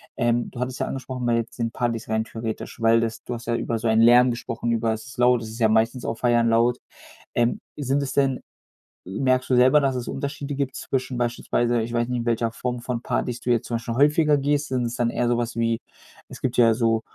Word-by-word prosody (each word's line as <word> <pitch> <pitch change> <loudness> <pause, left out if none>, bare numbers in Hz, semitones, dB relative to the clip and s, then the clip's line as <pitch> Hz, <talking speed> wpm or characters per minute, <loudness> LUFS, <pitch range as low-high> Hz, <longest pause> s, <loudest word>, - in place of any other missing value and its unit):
Ähm, 120 -1 0
du - - -9
hattest 125 0 -3
ja - - 0
angesprochen 130 -2 -5
weil 120 -1 +2
jetzt 115 0 -4
bei 120 - -1
den 115 - -1
Partys 120 -2 -2
rein 110 0 0
theoretisch 110 0 -6
weil 115 0 +4
das 115 -1 -3
du 125 - -5
hast 120 -1 -7
ja 120 - +1
über 115 -1 -2
so 115 - -2
einen 110 0 +4
Lärm 120 +2 +7
gesprochen, 120 0 -3
über 115 -1 +1
es 110 +3 -7
ist 125 - -12
laut, 125 -1 +4
es 110 - -7
ist 110 - -9
ja 110 -2 +4
meistens 115 +3 +1
auf 115 - -3
Feiern 120 -1 +3
laut. 115 +2 +3 0.6
Ähm, 120 0 +1 0.2
sind 140 -1 0
das 135 - -4
denn 135 -2 +1 0.7
merkst 130 +7 0
du 130 - +3
selber, 130 +4 +6
dass 135 -2 +1
es 125 - -4
Unterschiede 140 0 -4
gibt 135 -1 -2
zwischen 130 -1 -3
beispielsweise 120 0 0
ich 115 +1 -4
weiß 120 0 +1
nicht, 125 -1 -1
in 120 - -4
welcher 115 -1 0
Form 125 +1 -4
von 120 0 -3
Partys 125 0 -2
du - - -6
jetzt 120 -2 +1
zum 120 - -1
Beispiel 115 0 -4
häufiger 150 +3 +4
gehst. 145 +1 0
Sind 125 -2 -1
es 120 0 -3
dann 120 - +1
eher 120 +1 -1
sowas 120 -1 -1
wie 115 0 +1 0.5
es - - -11
gibt 125 -2 -2
ja 115 -2 +6
so 115 -1 +1
120 Hz, 245 wpm, -24 LUFS, 115-125 Hz, 0.7 s, Lärm